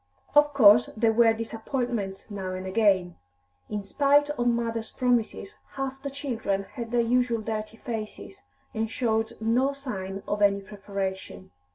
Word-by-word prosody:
Of 295 Hz, -1 st, +5 dB
course 225 Hz, -2 st, +7 dB
there 225 Hz, 0 st, +3 dB
were 230 Hz, 0 st, +5 dB
disappointments 225 Hz, -2 st, -3 dB
now 190 Hz, -2 st, -4 dB
and 185 Hz, 0 st, -6 dB
again. 190 Hz, -3 st, +2 dB, 0.5 s
In 210 Hz, -1 st, -3 dB
spite 285 Hz, +7 st, +3 dB
of 245 Hz, -4 st, -1 dB
mothers' 230 Hz, -1 st, -1 dB
promises, 245 Hz, -, -1 dB
half 270 Hz, 0 st, -4 dB
the 280 Hz, -, -4 dB
children 245 Hz, -8 st, -2 dB
had 235 Hz, -4 st, -5 dB
their 240 Hz, 0 st, +2 dB
usual 235 Hz, -1 st, +1 dB
dirty 215 Hz, 0 st, -4 dB
faces, 215 Hz, -, -6 dB, 0.3 s
and 220 Hz, 0 st, -1 dB
showed 225 Hz, -2 st, 0 dB
no 245 Hz, +5 st, +2 dB
sign 195 Hz, -8 st, -6 dB
of 205 Hz, 0 st, -2 dB
any 200 Hz, -1 st, +4 dB
preparation. 195 Hz, -, -6 dB
225 Hz, 145 wpm, -27 LUFS, 200-245 Hz, 0.5 s, course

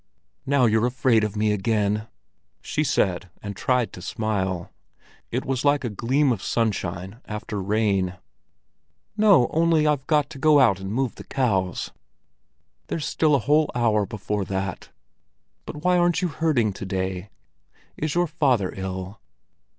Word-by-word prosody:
"Now 140 Hz, -2 st, +4 dB
you're 110 Hz, +1 st, +3 dB
afraid 125 Hz, -3 st, +2 dB
of 105 Hz, -1 st, -2 dB
me 105 Hz, 0 st, +1 dB
again!" 105 Hz, +1 st, 0 dB, 0.6 s
she -, -, -1 dB
said, 90 Hz, 0 st, 0 dB
and 100 Hz, -1 st, -5 dB
tried 125 Hz, +2 st, 0 dB
to 90 Hz, -, -9 dB
smile. 95 Hz, -3 st, -2 dB, 0.6 s
It -, -, -2 dB
was 130 Hz, -1 st, -1 dB
like 145 Hz, 0 st, +3 dB
a 120 Hz, -, -2 dB
gleam 130 Hz, +7 st, +1 dB
of 110 Hz, -6 st, -2 dB
sunshine 100 Hz, -1 st, -2 dB
after 105 Hz, -1 st, -5 dB
rain. 100 Hz, -2 st, 0 dB, 1.0 s
"No—only 165 Hz, -, +4 dB
I've 145 Hz, -3 st, +1 dB
got 150 Hz, -2 st, +2 dB
to 140 Hz, -, -9 dB
go 150 Hz, 0 st, +5 dB
out 115 Hz, -8 st, +4 dB
and 95 Hz, 0 st, -5 dB
move 130 Hz, +1 st, -1 dB
the -, -, -11 dB
cows." 95 Hz, -9 st, -1 dB, 1.0 s
"There's 155 Hz, -, -3 dB
still 155 Hz, -2 st, +2 dB
a 125 Hz, -, -1 dB
whole 150 Hz, +2 st, +3 dB
hour 110 Hz, -4 st, +2 dB
before 105 Hz, -2 st, -3 dB
that. 95 Hz, -1 st, -4 dB, 0.8 s
But 150 Hz, -, -7 dB
why 180 Hz, 0 st, +3 dB
aren't 175 Hz, 0 st, +2 dB
you 180 Hz, -, +1 dB
herding 130 Hz, -8 st, +1 dB
to 95 Hz, -, -7 dB
day? 95 Hz, 0 st, -3 dB, 0.7 s
Is 155 Hz, +1 st, -3 dB
your 175 Hz, 0 st, +3 dB
father 135 Hz, -, +1 dB
ill?" 95 Hz, +1 st, -5 dB
115 Hz, 150 wpm, -24 LUFS, 100-145 Hz, 1.0 s, go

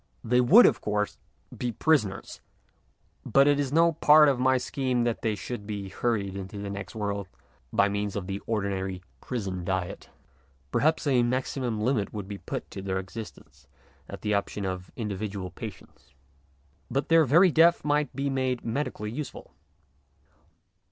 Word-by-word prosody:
They 125 Hz, +2 st, +3 dB
would, 200 Hz, -, +8 dB
of -, -, +3 dB
course, 105 Hz, 0 st, -2 dB, 0.4 s
be 125 Hz, -, -2 dB
prisoners, 110 Hz, -7 st, 0 dB, 0.8 s
but 140 Hz, +1 st, +4 dB
it 145 Hz, 0 st, +3 dB
is 140 Hz, -2 st, -1 dB
no 165 Hz, +2 st, +4 dB
part 150 Hz, -1 st, +6 dB
of 135 Hz, -3 st, 0 dB
my 130 Hz, 0 st, +3 dB
scheme 125 Hz, -1 st, -1 dB
that 120 Hz, -1 st, -1 dB
they 110 Hz, -2 st, 0 dB
should 105 Hz, +1 st, -6 dB
be 100 Hz, -2 st, -5 dB
hurried 100 Hz, -2 st, -1 dB
into 100 Hz, +2 st, -7 dB
the 100 Hz, 0 st, -5 dB
next 100 Hz, -1 st, -7 dB
world 100 Hz, -2 st, -3 dB, 0.4 s
by 100 Hz, -, +3 dB
means 100 Hz, 0 st, -2 dB
of 100 Hz, -3 st, -3 dB
the 100 Hz, +1 st, -4 dB
ordinary 95 Hz, -4 st, -2 dB, 0.2 s
prison 95 Hz, -7 st, -4 dB
diet. 95 Hz, -1 st, -3 dB, 0.6 s
Perhaps 155 Hz, +2 st, +2 dB
a 130 Hz, -4 st, +3 dB
maximum 125 Hz, -1 st, -1 dB
limit 110 Hz, -3 st, 0 dB
would 105 Hz, -3 st, -5 dB
be 100 Hz, -1 st, -7 dB
put -, -, -6 dB
to 95 Hz, -, -6 dB
their 95 Hz, -1 st, -2 dB
existence 95 Hz, -, -9 dB, 0.4 s
at -, -, -8 dB
the 105 Hz, -, 0 dB
option 100 Hz, 0 st, -2 dB
of 95 Hz, -1 st, -4 dB
individual 100 Hz, -3 st, -4 dB
patients. 70 Hz, -3 st, -11 dB, 0.7 s
But 135 Hz, +4 st, -1 dB
their 165 Hz, 0 st, +6 dB
very 170 Hz, +7 st, +5 dB
death 165 Hz, +1 st, +4 dB
might 150 Hz, 0 st, +1 dB
be 140 Hz, 0 st, -1 dB
made 130 Hz, -2 st, -1 dB
medically 115 Hz, -3 st, -3 dB
useful. 145 Hz, +4 st, -7 dB
110 Hz, 160 wpm, -27 LUFS, 100-135 Hz, 0.8 s, would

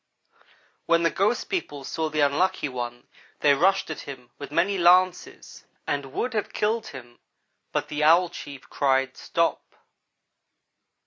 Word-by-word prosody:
when 170 Hz, 0 st, +3 dB
the 165 Hz, -, +3 dB
ghost 210 Hz, +5 st, 0 dB
people 145 Hz, -, -4 dB
saw 160 Hz, +3 st, -3 dB
the 155 Hz, 0 st, -1 dB
Unlucky 150 Hz, +4 st, +1 dB
one 120 Hz, -2 st, -6 dB, 0.4 s
they 145 Hz, -, +5 dB
rushed 185 Hz, +4 st, +2 dB
at 160 Hz, -, -6 dB
him 125 Hz, -3 st, -10 dB
with 140 Hz, -, -7 dB
many 180 Hz, +6 st, +1 dB
lances 180 Hz, +1 st, +2 dB, 0.2 s
and 140 Hz, -1 st, -2 dB
would 250 Hz, -, -2 dB
have 215 Hz, -2 st, -2 dB
killed 220 Hz, +2 st, -1 dB
him 120 Hz, -3 st, -11 dB, 0.5 s
but -, -, -2 dB
the 150 Hz, 0 st, -2 dB
Owl 170 Hz, +3 st, +5 dB
chief 140 Hz, -5 st, -10 dB
cried, 135 Hz, -1 st, +1 dB
'Stop!' -, -, -2 dB
155 Hz, 140 wpm, -25 LUFS, 140-185 Hz, 0.5 s, they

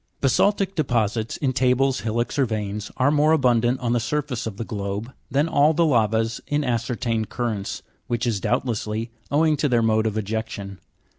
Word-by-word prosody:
Basa'ltic 195 Hz, -, +2 dB
deposits, 115 Hz, -, 0 dB
in 135 Hz, -3 st, 0 dB
tables, 130 Hz, +1 st, +2 dB
hillocks, 120 Hz, +4 st, -2 dB
or 135 Hz, -, +3 dB
veins, 105 Hz, -1 st, -3 dB
are 130 Hz, +2 st, +3 dB
more 150 Hz, +1 st, +4 dB
abundant 125 Hz, -3 st, +2 dB
on 120 Hz, -1 st, 0 dB
the 120 Hz, -, +2 dB
surface 130 Hz, -1 st, -2 dB
of 100 Hz, -3 st, -6 dB
the 115 Hz, -, -3 dB
globe 105 Hz, +3 st, -4 dB, 0.2 s
than 145 Hz, +4 st, +2 dB
all 150 Hz, 0 st, +3 dB
the 170 Hz, +1 st, +3 dB
lavas 115 Hz, -4 st, +1 dB
in 150 Hz, 0 st, 0 dB
ascertained 115 Hz, -2 st, -1 dB
currents, 110 Hz, -5 st, -3 dB, 0.2 s
which 120 Hz, 0 st, -1 dB
is, 115 Hz, -4 st, 0 dB
doubtlessly, 115 Hz, -1 st, -2 dB, 0.2 s
owing 155 Hz, +2 st, +3 dB
to 145 Hz, -, +1 dB
their 120 Hz, -2 st, +3 dB
mode 110 Hz, 0 st, +2 dB
of 110 Hz, 0 st, -2 dB
ejection. 105 Hz, -2 st, -4 dB
120 Hz, 170 wpm, -23 LUFS, 110-135 Hz, 0.2 s, more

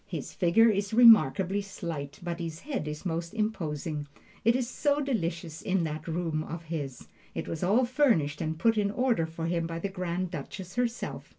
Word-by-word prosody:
His -, -, -5 dB
figure 185 Hz, +6 st, +4 dB
is 200 Hz, +1 st, -1 dB
remarkably 205 Hz, -, +6 dB
slight, 160 Hz, -7 st, -6 dB
but 170 Hz, 0 st, -3 dB
his 165 Hz, -1 st, -5 dB
head 270 Hz, -, -3 dB
is 150 Hz, +4 st, -6 dB
most 170 Hz, +2 st, -3 dB
imposing. 155 Hz, -8 st, -2 dB, 0.4 s
It 230 Hz, +1 st, +4 dB
is 255 Hz, -2 st, 0 dB
so 285 Hz, +3 st, +1 dB
delicious 170 Hz, -, -2 dB
in 185 Hz, -2 st, +1 dB
that 155 Hz, 0 st, -4 dB
room 165 Hz, -2 st, -1 dB
of 165 Hz, +2 st, -6 dB
his! 145 Hz, -6 st, -5 dB, 0.3 s
It -, -, -3 dB
was 165 Hz, -, -4 dB
all 215 Hz, +8 st, +3 dB
furnished 230 Hz, -, +2 dB
and 160 Hz, 0 st, -2 dB
put 225 Hz, +5 st, +3 dB
in 200 Hz, -1 st, +1 dB
order 230 Hz, -6 st, +1 dB
for 165 Hz, 0 st, -5 dB
him 170 Hz, 0 st, 0 dB
by 165 Hz, 0 st, -4 dB
the 195 Hz, +4 st, -3 dB
Grand 180 Hz, -1 st, -3 dB
Duchess 180 Hz, +4 st, -7 dB
herself. 245 Hz, -1 st, -2 dB
175 Hz, 185 wpm, -29 LUFS, 160-220 Hz, 0.4 s, remarkably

